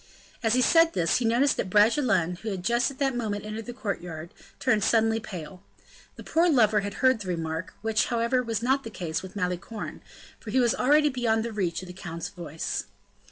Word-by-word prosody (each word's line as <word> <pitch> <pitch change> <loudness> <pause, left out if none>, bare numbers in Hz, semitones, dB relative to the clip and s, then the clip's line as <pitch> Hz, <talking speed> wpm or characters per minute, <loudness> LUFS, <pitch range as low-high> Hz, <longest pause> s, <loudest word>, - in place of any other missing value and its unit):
As 225 -1 +2
he 255 - +4
said 330 +4 +5
this, 165 -2 +2
he 245 - -1
noticed 240 +5 +3
that 185 - -2
Bragelonne, 210 - +3
who 220 - -5
had 190 -3 -4
just 235 +3 +2
at 275 - -10
that 270 -2 0
moment 210 -4 -3
entered 215 +1 -6
the - - -4
courtyard, 175 -8 -5 0.3
turned 240 -6 +2
suddenly 225 0 +3
pale. 180 -5 -8 0.5
The - - -10
poor 335 +2 +2
lover 220 -8 +4
had 200 0 -4
heard 260 -3 +5
the 200 - -7
remark, 165 -1 -3
which, 220 0 +2
however, 235 +1 +1
was 230 -2 -3
not 265 +2 +2
the 225 - -6
case 165 -6 -4
with 190 +1 -10
Malicorne, 180 +3 -4 0.4
for 220 - -9
he 260 - +2
was 240 -3 +3
already 295 +3 +4
beyond 230 -4 0
the 230 - -4
reach 185 -4 -2
of - - -9
the 180 - -8
count's 170 -2 -6
voice. 165 -3 -4
220 Hz, 205 wpm, -27 LUFS, 180-245 Hz, 0.5 s, said